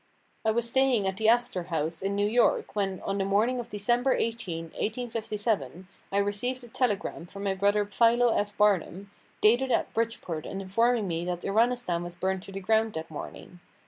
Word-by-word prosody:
I 220 - +2
was 235 +1 +1
staying 260 -4 +2
at 190 0 -1
the 220 +1 +3
Astor 235 -7 +2
House, 160 -1 -2
in 195 +1 -1
New 205 0 +2
York, 235 0 +2
when, 195 -3 -1
on 195 0 -2
the - - +1
morning 215 +6 +1
of 240 -1 -6
December 240 +5 +1
18, 185 -8 -3
1857, 215 - -3 0.2
I 200 - 0
received 210 +6 -1
a - - -10
telegram 210 -8 -1
from 200 +2 -8
my 195 -1 +1
brother 205 +2 +2
Philo 230 +3 +3
F. 205 0 -1
Barnum, 200 -1 +1 0.3
dated 240 +5 +4
at - - 0
Bridgeport 225 -9 -2
and 195 - -5
informing 225 +3 +1
me 170 -1 -2
that 175 -1 -3
Iranistan 225 -4 +1
was 175 0 -7
burned 190 +1 -1
to 195 - -9
the 195 - -5
ground 220 +2 +1
that 160 0 -6
morning. 175 +3 -9
205 Hz, 185 wpm, -28 LUFS, 190-230 Hz, 0.3 s, dated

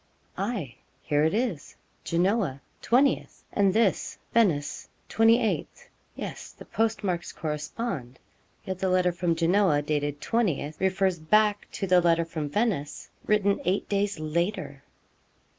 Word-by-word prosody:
'Aye, 195 - -3 0.3
here 145 0 +1
it 160 - +2
is, 220 - -2 0.3
Genoa, 175 - +1 0.2
20th, 265 +4 +1
and 200 -2 +3
this, 215 -1 +1 0.2
Venice, 175 -11 +1 0.2
28th. 230 - +2 0.3
Yes, - - -7
the - - -13
postmarks 205 -6 -1
correspond; 150 - -4 0.5
yet 190 -1 -4
the 190 - 0
letter 180 -1 +3
from 175 -1 0
Genoa, 170 -2 +3
dated 145 -1 -1
20th, 165 -10 -1
refers 190 -1 +1
back 210 +6 +2
to 195 - -2
the 180 -1 +5
letter 170 -1 +3
from 155 -3 -4
Venice, 185 -6 -2 0.2
written 205 -1 +2
eight 185 +3 0
days 200 -3 0
later! 155 -3 -2
185 Hz, 125 wpm, -27 LUFS, 155-210 Hz, 0.5 s, the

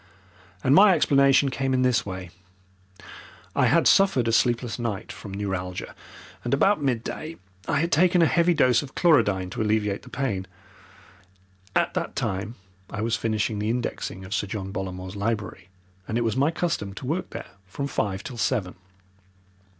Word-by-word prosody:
And 130 - +4
my 195 +2 +7
explanation 140 -2 +4
came 135 0 -1
in 130 - +2
this 125 -2 +2
way. 95 -2 -6 1.2
I - - +4
had - - +3
suffered 190 - +4
a - - +2
sleepless 120 +1 +1
night 115 -3 -3
from 100 - -9
neuralgia, 95 -2 -4 0.5
and 120 +3 +1
about 195 +4 +3
midday 140 +5 -3 0.3
I 145 - +1
had 170 +1 -1
taken 180 +3 +4
a 165 - +6
heavy 170 +1 +3
dose 125 -6 +4
of 140 -3 -10
chlorodyne 100 - +3
to - - -3
alleviate 105 -2 0
the 125 - -14
pain. 110 -9 -2 1.3
At - - +2
that - - -3
time 100 +5 -3 0.3
I 105 - -5
was 115 +1 +1
finishing 110 -1 -1
the 105 +1 -1
indexing 115 -5 -3
of 95 - -6
Sir 100 - -1
John 95 -1 -5
Bollamore's 95 -1 -5
library, 100 -3 -3 0.4
and 110 - -1
it - - +1
was 115 -1 0
my 140 +3 +3
custom 160 - -2
to - - -7
work 165 +7 -2
there - - -8 0.2
from 140 +10 -4
five 100 -8 -2
till 125 - -7
seven. 110 -5 0
115 Hz, 165 wpm, -25 LUFS, 100-140 Hz, 1.3 s, my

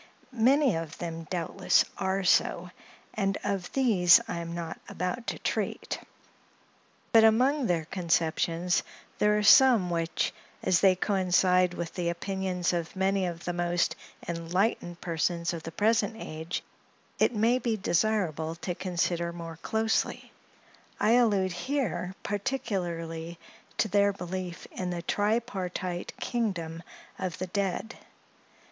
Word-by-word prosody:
Many 255 - +3
of 165 -2 -6
them 165 -1 -5
doubtless 170 -3 +2
are 190 0 -1
so, 180 0 +2 0.4
and 195 -1 0
of 195 -3 -2
these 205 -11 +6
I - - -3
am 170 0 -5
not 170 -1 -5
about 205 +8 -3
to - - -2
treat; - - -2 1.1
but 225 -1 +7
among 250 +5 +4
their 170 -3 0
conceptions, 170 0 0 0.4
there 210 0 +4
are 210 - 0
some 230 -5 +7
which, 165 -1 -1 0.3
as 180 - +3
they 190 -2 +5
coincide 180 -2 +2
with 170 -1 -5
the 175 -2 -1
opinions 180 0 -2
of 170 0 -3
many 190 0 +1
of 170 -1 -6
the 175 - -1
most 175 0 0 0.3
enlightened 175 +1 -1
persons 170 +1 -1
of 165 - -5
the 165 - -7
present 215 +4 +1
age, 160 -3 -5 0.6
it 245 - +3
may 230 +4 +3
be 230 -3 -1
desirable 175 -5 0
to 175 +1 -4
consider 175 -1 -1
more 165 -1 -8
closely. 220 +5 -1 0.7
I 215 - +3
allude 210 -6 +3
here 190 - -2
particularly 175 -7 -3 0.4
to - - +2
their 200 0 +3
belief 180 -1 -5
in 185 -1 -4
the 175 -1 -4
tripartite 195 -4 -2
kingdom 175 -9 -2 0.4
of 180 -3 -3
the 185 - -3
dead. 200 +4 -3
180 Hz, 130 wpm, -28 LUFS, 170-210 Hz, 1.1 s, but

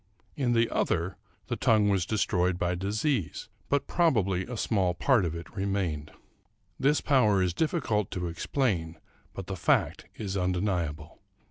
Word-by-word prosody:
In 130 -5 +1
the 115 0 +3
other 85 +3 0 0.3
the - - -2
tongue 105 -2 +3
was 95 -3 +1
destroyed 90 -4 +1
by 90 0 0
disease, 100 - -2 0.2
but 140 0 +1
probably 100 - +1
a 125 -1 -5
small 95 -6 +1
part 120 0 +3
of 85 -1 -3
it 85 +3 -9
remained. 95 -7 -2 0.7
This 145 +3 +3
power 110 -9 +3
is 90 -2 0
difficult 120 - 0
to 90 -1 -3
explain, 85 - -1 0.3
but 95 - -7
the 95 - -4
fact 85 - +1
is 100 -3 -4
undeniable. 90 -5 -2
95 Hz, 145 wpm, -28 LUFS, 90-115 Hz, 0.7 s, the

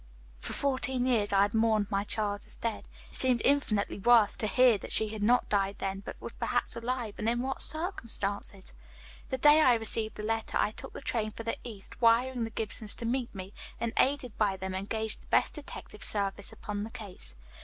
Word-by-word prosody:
For - - -5
fourteen 260 -2 0
years 225 -5 +2
I 195 0 +5
had 205 - -1
mourned 220 -2 +2
my 200 0 +1
child 205 -1 -1
as - - -3
dead. 230 -2 -3 0.3
It - - -7
seemed 255 -2 +3
infinitely 235 -9 +1
worse 225 0 +5
to 215 - -1
hear 240 0 +5
that - - -8
she 220 - +4
had 215 0 -6
not 240 +4 +3
died 200 -1 0
then, 195 0 -3
but 195 - -9
was - - -6
perhaps - - -1
alive, 235 -2 -3
and 215 - +1
in 240 +1 0
what 270 0 -2
circumstances? 220 - -1 0.6
"The 260 - -1
day 295 +4 +6
I 250 -5 +6
received 225 -1 +2
the 210 - -6
letter 225 +1 -1
I - - +2
took - - -5
the - - -8
train 225 -5 -1
for 230 - -8
the 230 - -2
east, 220 -3 -9
wiring 235 +1 +3
the - - -5
Gibsons 220 -1 -2
to 235 - -6
meet 240 -1 -2
me, 190 +1 -7 0.3
and 235 -1 -2
aided 265 -4 +1
by 200 -3 +2
them 190 0 -4
engaged 215 +3 -2
the - - -21
best - - +2
detective 280 -7 -8
service 200 -1 -2
upon 205 -1 -5
the 220 - -6
case. 185 - -9
220 Hz, 210 wpm, -30 LUFS, 205-245 Hz, 0.6 s, day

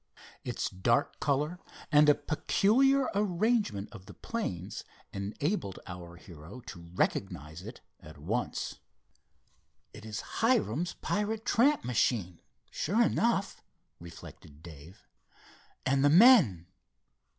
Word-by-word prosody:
Its - - -3
dark 105 +6 0
color 150 +5 -1 0.3
and 150 0 +6
a 145 - +6
peculiar 260 - +2
arrangement 200 - 0
of 100 -4 -12
the 100 - -12
planes 105 - -5 0.3
enabled 100 - -3
our 90 -2 -9
hero 85 +4 -12
to 85 -7 -11
recognize 80 -5 -2
it 110 +6 -10 0.2
at 75 -3 -13
once. 105 +12 -3 1.1
"It 105 - -12
is 110 -1 -5 0.2
Hiram's 180 - +1
pirate 215 +2 -2
tramp 280 +6 +3
machine, 105 -7 0 0.3
sure 205 +11 +1
enough," 230 -4 0 0.4
reflected 80 -3 -13
Dave, 80 +1 -13 0.8
"and 135 +1 +2
the 145 - +5
men." 170 - +6
120 Hz, 105 wpm, -30 LUFS, -, 1.1 s, and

